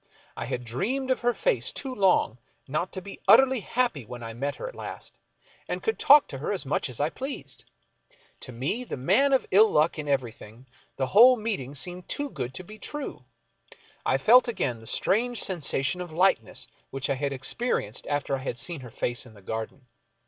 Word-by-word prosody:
I - - -4
had 125 - -4
dreamed 245 - -1
of 260 - +1
her 245 0 +2
face - - +1
too 265 -2 -5
long 185 - +2 0.3
not 155 +7 -2
to 185 - -6
be 200 - -10
utterly 265 -1 +6
happy 230 - -1
when 120 +2 -9
I 115 0 -6
met 140 +5 -3
her - - -6
at - - -8
last - - -8 0.5
and - - -4
could 445 - -1
talk 290 0 +7
to 135 - -6
her 145 - -2
as 195 -6 -2
much 135 0 -1
as 125 - -6
I 150 +3 +1
pleased. 270 +2 -7 0.7
To 130 - -7
me, 135 - -2
the 245 - -6
man 195 - +3
of 265 - +3
ill 215 +3 +7
luck 155 +1 +2
in 150 - -4
everything, 120 -3 -3 0.3
the 135 - +1
whole 240 - +7
meeting 200 - -3
seemed 180 +6 -5
too 285 -1 -3
good 125 +2 -5
to 185 - -4
be 215 +4 -12
true. 290 - -6 0.8
I 130 - +2
felt 245 - +6
again 125 - -1
that 110 - -13
strange 235 - +2
sensation 170 -2 0
of 175 -2 -7
lightness 165 - +1 0.2
which 135 -1 -3
I 140 - +1
had 140 +1 -2
experienced 135 - -2
after 145 -1 -1
I - - -8
had 125 -2 -4
seen 165 +6 -3
her 125 -2 -10
face 120 +3 -3
in 110 - -16
the 100 - -15
garden. 110 +6 -5
155 Hz, 200 wpm, -27 LUFS, -, 0.8 s, talk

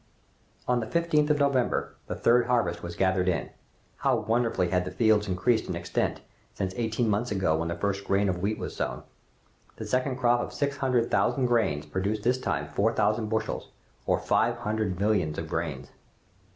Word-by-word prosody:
On 125 -1 +2
the 110 - -4
15th 155 0 +2
of 150 - +3
November, 140 -4 +1
the - - -3
third 120 0 +3
harvest 120 -9 +1
was 85 0 -6
gathered 95 0 +1
in. 90 - -2 0.5
How - - +2
wonderfully 115 -6 0
had 90 0 +1
the 90 - -4
field 105 +2 +2
increased 105 +6 +1
in - - -2
extent, - - -2 0.3
since 95 -1 -2
eighteen 115 0 0
months 110 +3 0
ago, 95 -5 +1
when 85 +1 -2
the 85 - -2
first 100 +2 -2
grain 100 +1 +2
of 90 -2 -1
wheat 105 +3 0
was - - -6
sown! - - -3 0.7
The - - -6
second 130 +1 0
crop 120 -1 +3
of - - -4
six 140 -1 -1
hundred 125 -4 +1
thousand 135 -3 +2
grains 105 -12 +1
produced 100 +7 -2
this 125 +2 +2
time - - -1
four 110 +3 +1
thousand 110 +1 +1
bushels, 110 0 -2 0.4
or - - +3
five - - +1
hundred 105 -4 -2
millions 100 -7 +1
of 80 - -4
grains! 80 -5 -4
110 Hz, 185 wpm, -27 LUFS, 95-120 Hz, 0.7 s, of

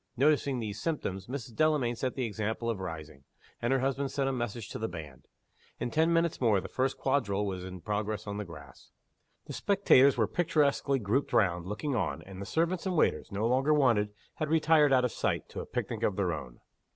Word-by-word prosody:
Noticing 140 0 +3
these 105 -3 -4
symptoms, 95 - -3
Mrs. 125 -2 -6
Delamayn 150 -4 +2
set 130 +2 -2
the 130 - -1
example 110 +2 -2
of 110 - -4
rising; 80 -6 -7 0.4
and 120 - 0
her 135 -1 +2
husband 135 +1 0
sent 135 -1 -1
a - - +1
message 120 -3 -4
to - - -6
the 110 - -1
band. 75 - -9 0.5
In 120 - -2
ten 160 +4 +3
minutes 165 -2 +1
more 110 -5 +4
the - - -6
first 130 +1 -1
quadrille 110 -7 0
was 95 -2 -4
in 90 -1 -8
progress 105 +2 -2
on 100 -1 -4
the 105 - -3
grass; 75 -8 -13 0.6
the - - -7
spectators 140 -10 +4
were 110 - +3
picturesquely 150 -3 +1
grouped 125 +5 -1
round, 90 -6 +2
looking 135 +9 -3
on; 105 - -1
and 95 0 -10
the 100 - -6
servants 170 - 0
and 185 - -1
waiters, - - +1
no 100 +3 -1
longer 135 +5 +3
wanted, 115 -8 +3 0.3
had 155 - -2
retired 155 -2 +4
out 130 -1 +4
of 125 - -1
sight, - - -1
to - - -6
a - - -6
picnic - - -3
of 100 - +1
their 95 -4 0
own. 65 -6 -8
120 Hz, 210 wpm, -30 LUFS, 100-140 Hz, 0.6 s, more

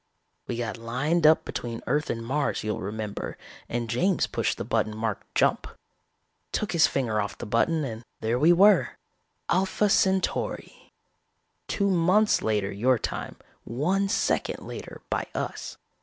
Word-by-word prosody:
We 120 - -3
got 115 -3 -3
lined 140 +8 +1
up 155 - +5
between 115 -1 -5
Earth 150 +1 0
and 115 0 -3
Mars, 140 +4 -1
you'll 105 0 -2
remember, 105 +1 -5 0.3
and 120 0 -2
James 175 - +1
pushed - - -1
the - - -3
button 110 +1 -1
marked 110 -2 -4
'Jump'. - - +2 0.8
Took 210 - -1
his 165 -3 +5
finger 110 -6 0
off 100 0 -4
the - - -6
button 150 +8 +1
and 115 -2 -6 0.2
there 115 +3 0
we 160 +5 +6
were: 200 +4 +5 0.5
Alpha 190 +3 +2
Centauri. 190 -1 0 0.8
Two 200 -1 +1
months 185 +5 +3
later 105 -3 0
your 125 +6 +2
time, - - -4 0.3
one 185 - 0
second - - 0
later - - -8
by - - -1
us. - - -4
125 Hz, 145 wpm, -26 LUFS, 110-175 Hz, 0.8 s, we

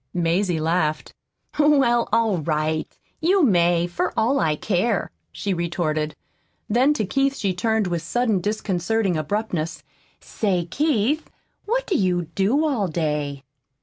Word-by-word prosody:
Mazie 175 0 +1
laughed. 155 -1 -1 0.5
"Well, 270 -6 +4
all 225 -4 +2
right, 155 0 -1 0.3
you 370 +3 +3
may, 175 - +3
for 175 0 -2
all 250 +5 +2
I 155 -2 +1
care," 200 +5 0 0.2
she 200 -2 -2
retorted. 160 -3 -2 0.5
Then 255 +7 +3
to 215 - -1
Keith 275 +6 +1
she 200 -7 -1
turned 220 +3 0
with 175 -2 -2
sudden 230 -4 0
disconcerting 205 0 -1
abruptness: 165 -2 -2 0.4
"Say, 185 -5 -1
Keith, 290 - 0 0.4
what - - 0
do 385 - -1
you 180 - +1
do 230 +11 +2
all 245 -10 0
day?" 150 -4 -2
190 Hz, 130 wpm, -23 LUFS, 170-235 Hz, 0.5 s, Well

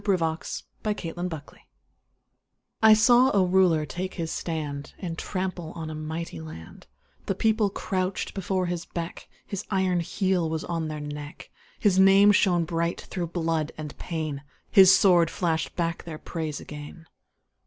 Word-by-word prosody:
VERSE: 165 -5 -1 0.2
THE 210 -1 -1
THREE 165 -4 -5
RULERS 175 -4 -5 1.3
I 220 -1 +8
saw 245 +4 +6
a 190 - +5
Ruler 180 -4 +3
take 185 +5 -5
his 165 -3 -3
stand 150 -4 -4
And 170 -4 -5
trample 185 -2 -4
on 160 -1 -6
a - - -5
mighty 155 - -5
land; 80 +1 -11 0.4
The 195 - 0
People 220 0 +2
crouched 185 -1 -2
before 190 -1 -1
his 175 -1 -3
beck, 170 0 -6 0.2
His 200 0 -5
iron 190 -3 +1
heel 180 -1 0
was 160 0 -2
on 165 -2 -2
their 155 -1 -5
neck, 145 0 -8 0.3
His 190 -3 +3
name 195 +2 +7
shone 175 -4 +3
bright 170 0 -1
through 175 -2 -4
blood 165 -2 -1
and 150 -2 -7
pain, 155 -4 -4 0.3
His 190 -1 +8
sword 175 -4 +5
flashed 165 -3 -1
back 170 -1 -2
their 160 -2 -7
praise 155 -2 -4
again. 150 +3 -10
170 Hz, 155 wpm, -26 LUFS, 160-190 Hz, 1.3 s, I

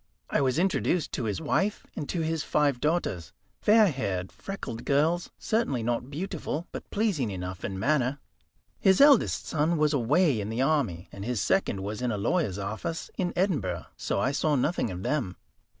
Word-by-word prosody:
I - - +2
was 130 0 +1
introduced 180 -2 +1
to 125 - -2
his 105 -2 -1
wife 195 +6 0
and 145 - -5
to 170 - -1
his 160 0 -1
five 145 -5 +1
daughters, 150 - -1 0.3
fair 215 0 +6
haired, 95 - -3
freckled 155 -12 -6
girls, 160 +5 +1
certainly 180 - 0
not 120 +2 -1
beautiful, 170 0 -4
but - - -8
pleasing 200 - 0
enough 90 -2 -5
in 95 -1 -3
manner. 135 +3 +1 0.6
His 190 -1 +4
eldest 280 -4 +5
son 160 +1 +1
was 150 0 +2
away 140 +1 +3
in 100 - -4
the 115 +4 0
army, 125 - 0
and 100 - -8
his 120 0 -1
second 100 - +1
was 105 +3 -4
in 125 -1 0
a 105 - -1
lawyer's 100 - 0
office 110 +11 -4
in 180 -2 -1
Edinburgh; 115 - 0
so - - -2
I 135 - +1
saw 150 +1 +1
nothing 150 +6 0
of 90 0 -6
them. 115 -11 -1
140 Hz, 180 wpm, -28 LUFS, 110-170 Hz, 0.6 s, fair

